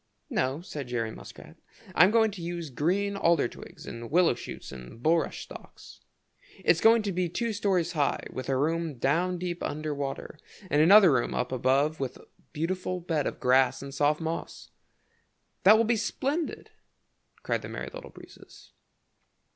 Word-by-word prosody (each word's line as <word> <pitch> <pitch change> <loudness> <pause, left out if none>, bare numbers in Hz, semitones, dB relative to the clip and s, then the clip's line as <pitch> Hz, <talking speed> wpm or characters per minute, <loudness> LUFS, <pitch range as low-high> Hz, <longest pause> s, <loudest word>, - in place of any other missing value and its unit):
"No," 130 +5 0
said 145 -6 -7
Jerry 115 -2 -2
Muskrat, - - -12 0.4
"I'm 180 +3 +6
going 220 0 +3
to 195 -3 -9
use 170 -3 -5
green 190 +10 0
alder 170 -8 +3
twigs - - -12
and 115 0 -7
willow 175 0 +4
shoots - - -9
and 65 - -11
bulrush 165 0 +1
stalks. - - -13 0.7
It's 165 - +4
going 225 0 +6
to 205 - -1
be 180 -1 -1
two 230 +6 -2
stories 190 -5 0
high, 150 -5 0
with 130 0 -5
a 135 - +1
room 160 +2 -1
down 170 +9 +1
deep 175 0 -4
under 155 0 -3
water 140 +2 -5 0.3
and 145 - +4
another 190 +2 +8
room 125 -2 0
up 125 - -2
above 135 +5 +1
with 130 -2 -4
a - - -17 0.3
beautiful 180 +3 -2
bed 165 -4 -1
of - - -5
grass 130 +1 +3
and 140 0 -8
soft 150 +2 +2
moss." 165 0 -5 0.9
"That 210 +3 +9
will 230 - +3
be 230 +1 +2
splendid!" 280 +8 -3 0.7
cried - - -1
the - - -8
Merry - - -6
Little - - -9
Breezes. - - -16
165 Hz, 165 wpm, -28 LUFS, 135-185 Hz, 0.9 s, That